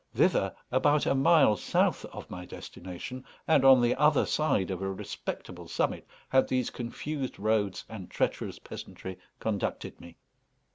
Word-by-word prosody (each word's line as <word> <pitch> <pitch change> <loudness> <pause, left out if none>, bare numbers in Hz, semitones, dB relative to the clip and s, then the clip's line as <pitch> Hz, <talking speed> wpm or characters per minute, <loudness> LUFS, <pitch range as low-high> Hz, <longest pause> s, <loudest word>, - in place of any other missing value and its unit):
Thither, - - +2 0.2
about 145 0 +3
a - - +3
mile 140 -4 +5
south - - +1
of - - -9
my 90 0 -7
destination, 95 +8 -8 0.2
and 160 -4 +5
on 135 -2 +8
the 120 0 +3
other 150 +1 +4
side 105 -11 +1
of 95 0 -4
a 95 0 -1
respectable 95 - -6
summit, - - -1 0.2
had 130 0 +4
these 130 -1 0
confused 130 +3 -4
roads 105 -2 0
and 105 -5 -8
treacherous - - -1
peasantry 95 -1 -8 0.2
conducted 105 -3 -3
me. 85 -1 -13
120 Hz, 145 wpm, -29 LUFS, 95-135 Hz, 0.2 s, on